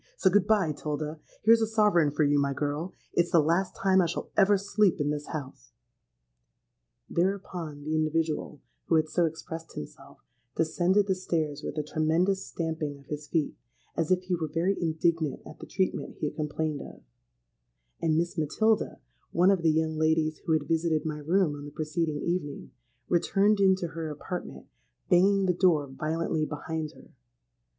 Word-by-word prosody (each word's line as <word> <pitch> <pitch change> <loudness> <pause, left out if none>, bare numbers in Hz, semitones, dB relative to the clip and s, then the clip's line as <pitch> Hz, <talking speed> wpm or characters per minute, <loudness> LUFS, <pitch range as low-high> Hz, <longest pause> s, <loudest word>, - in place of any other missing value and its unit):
So 190 - +3
good 200 0 +3
bye, 200 -7 +3
'Tilda. 150 +1 -4 0.2
Here's 225 +1 +6
a 220 - +2
sovereign 210 -8 +3
for 150 +2 +1
you, 145 0 +3
my 140 0 +1
girl. 145 +6 -3 0.2
It's 175 0 +2
the 170 - +5
last 170 +5 +1
time 190 -1 +3
I 175 - +2
shall 170 - -5
ever 200 0 +5
sleep 200 -1 +2
in 145 0 +1
this 150 0 -4
house.'—Thereupon - - -7
the 155 +2 -2
individual, 155 -1 -1 0.2
who 165 - +2
had 155 -1 +2
so 170 +2 +2
expressed 160 0 -6
himself, 75 - -9 0.4
descended 175 +5 +2
the 195 - +1
stairs 160 -5 -2
with 150 - -5
a 150 - 0
tremendous 165 +6 +1
stamping 160 -3 -3
of 140 - -18
his 150 +1 -6
feet, 155 -2 0 0.4
as 165 -2 0
if 185 0 +2
he 185 0 -2
were 165 -2 -1
very 175 +5 +1
indignant 160 -2 0
at - - -11
the - - -9
treatment 190 0 -2
he - - -2
had 150 - -3
complained 155 -1 -2
of; - - -11 1.0
and 160 -1 +2
Miss 175 +1 -1
Matilda—one 175 - +1
of 190 -3 +1
the 165 - +3
young 160 0 +1
ladies 155 0 +1
who 160 - -1
had 155 -2 +2
visited 160 -2 +1
in - - -3
my 150 0 -4
room 165 +1 +2
on 145 0 -8
the - - -7
preceding 155 0 -2
evening—returned 175 - -1
into 190 -3 +3
her 160 0 -5
apartment, 165 +4 -6 0.5
banging 195 +2 +5
the 180 - +3
door 170 -5 +3
violently 155 +3 -2
behind 155 +1 -4
her. - - -17
160 Hz, 170 wpm, -28 LUFS, 150-180 Hz, 1.0 s, Here's